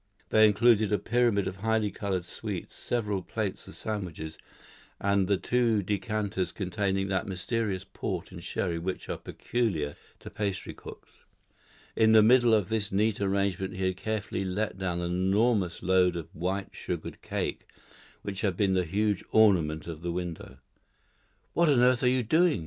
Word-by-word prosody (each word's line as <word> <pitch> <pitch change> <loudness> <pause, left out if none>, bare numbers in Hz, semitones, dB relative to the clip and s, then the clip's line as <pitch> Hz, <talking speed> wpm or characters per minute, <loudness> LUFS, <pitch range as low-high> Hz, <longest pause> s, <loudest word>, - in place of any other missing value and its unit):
They 110 0 +6
included 110 0 +4
a 105 - +3
pyramid 120 -4 +2
of 95 - -4
highly 110 0 +1
coloured 95 -5 -2
sweets, - - -5
several 105 -5 -1
plates 100 +2 -4
of - - -9
sandwiches, 85 -7 -4 0.6
and 100 -1 +2
the 100 0 +2
two 115 -1 +1
decanters 100 -1 -1
containing 95 0 -1
that 95 -1 -1
mysterious 95 0 -2
port 95 -2 -5
and 85 -2 -9
sherry 85 -2 -2
which 90 +2 -4
are - - -3
peculiar 90 -12 -2 0.3
to - - -9
pastry 100 -3 -3
cooks. - - -12 0.8
In 110 0 +5
the 110 -1 +8
middle 120 +1 +6
of 105 -3 0
this 110 -2 0
neat 105 +1 +1
arrangement 95 -1 0
he 95 0 -1
had 95 0 0
carefully 105 -2 -2
let 95 +1 -2
down 90 -2 -1
the 85 - -2
enormous 95 +1 +1
load 90 -1 +3
of 85 -2 -6
white 95 +4 -2
sugared - - -5
cake - - -3 0.6
which 100 -1 -4
had 95 -5 0
been 100 -2 +2
the 90 -1 +2
huge 105 +3 0
ornament 85 -8 +4
of 80 -2 -7
the 85 0 -2
window. 85 -6 -5 1.0
"What 170 -1 +3
on 135 -4 +4
earth 125 0 +4
are 125 - +3
you 125 0 +3
doing?" 160 - +3
100 Hz, 165 wpm, -28 LUFS, 90-110 Hz, 1.0 s, the